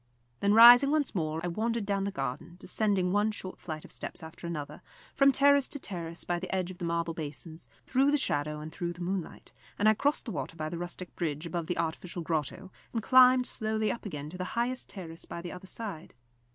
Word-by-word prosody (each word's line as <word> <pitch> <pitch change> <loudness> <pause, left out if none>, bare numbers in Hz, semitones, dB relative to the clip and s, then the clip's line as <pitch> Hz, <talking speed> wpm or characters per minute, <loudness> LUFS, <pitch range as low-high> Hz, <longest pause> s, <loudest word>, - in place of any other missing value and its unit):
Then 200 +1 +3
rising 245 +4 +10
once 300 -2 +1
more 160 -4 -1
I - - 0
wandered 225 +5 -1
down 200 -1 0
the 200 - -2
garden, 135 +2 -4
descending 190 -1 0
one 205 +2 +2
short 190 -3 -8
flight 155 -2 -6
of - - -14
steps 180 - -7
after 160 +2 -8
another, 150 -3 -5 0.3
from 275 0 +5
terrace 280 0 +4
to 285 - -5
terrace 170 -7 -5
by 175 0 -1
the 185 - -6
edge 185 -1 -1
of 180 - -12
the 175 - -3
marble 170 0 -1
basins, 160 +1 -8 0.2
through 270 +2 +3
the 295 - +3
shadow 150 - -1
and 155 +1 -7
through 175 +1 -3
the 175 - -11
moonlight; 185 -1 -4 0.2
and 205 - +3
I 215 - +7
crossed 285 +7 0
the 235 - -4
water 145 0 -4
by 155 -1 -3
the 170 - -5
rustic 175 +1 -6
bridge 155 -2 -3
above 170 -1 -3
the 175 - -2
artificial 170 +1 -3
grotto, 165 +4 -3 0.2
and 225 -3 -2
climbed 255 0 +6
slowly 220 -1 0
up 235 - -6
again 150 -4 -6
to 180 - -9
the - - -1
highest 250 +2 -1
terrace 165 -4 -8
by - - -7
the 175 0 -6
other 180 +1 -10
side. 195 -7 -7
180 Hz, 220 wpm, -30 LUFS, 165-220 Hz, 0.3 s, rising